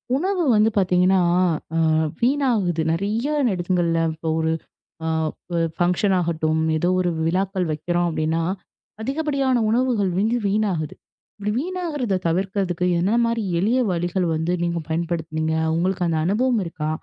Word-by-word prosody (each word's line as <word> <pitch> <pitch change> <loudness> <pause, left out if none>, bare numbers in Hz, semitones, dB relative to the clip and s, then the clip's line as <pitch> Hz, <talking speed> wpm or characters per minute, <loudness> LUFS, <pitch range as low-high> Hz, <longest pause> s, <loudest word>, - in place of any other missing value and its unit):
உணவு 365 +4 0
வந்து 215 +1 +4
பார்த்தீங்கன்னா, 185 0 +3 0.6
அ - - +2 0.4
வீணாகுது. 235 - +1
நிறைய 210 - -1 0.3
இடங்கள்ல 175 -2 0 0.2
இப்ப 160 +1 -5
ஒரு 160 0 +1 0.5
அ - - -1 0.7
ஃபங்ஷன் 180 +3 +2
ஆகட்டும், 160 -2 0 0.2
ஏதோ 175 +3 +1
ஒரு 180 - +1 0.2
விழாக்கள் 185 +1 0
வெக்கிறோம், 175 +3 0
அப்பிடின்னா 160 +1 -1 0.6
அதிகப்படியான 275 0 0
உணவுகள் 230 -5 +1
வந்து 220 +5 +2
வீணாகுது. 195 -7 -1 0.4
இப்பிடி 205 0 -2
வீணாகுறத 305 - -2
தவிர்க்க 195 +4 0 0.3
என்னென்னமாரி 230 +5 +1 0.2
எளிய 225 +8 +2
வழிகள் 175 +1 -1
வந்து 160 +2 -1
நீங்கப் 170 -2 -2
பயன்படுத்துனீங்க? 160 -1 -2 0.2
உங்களுக்கு 180 +1 0
அந்த 165 -1 0
அனுபவம் 230 +4 +1
இருக்கா? 155 -2 -4
185 Hz, 120 wpm, -22 LUFS, 170-230 Hz, 0.7 s, வந்து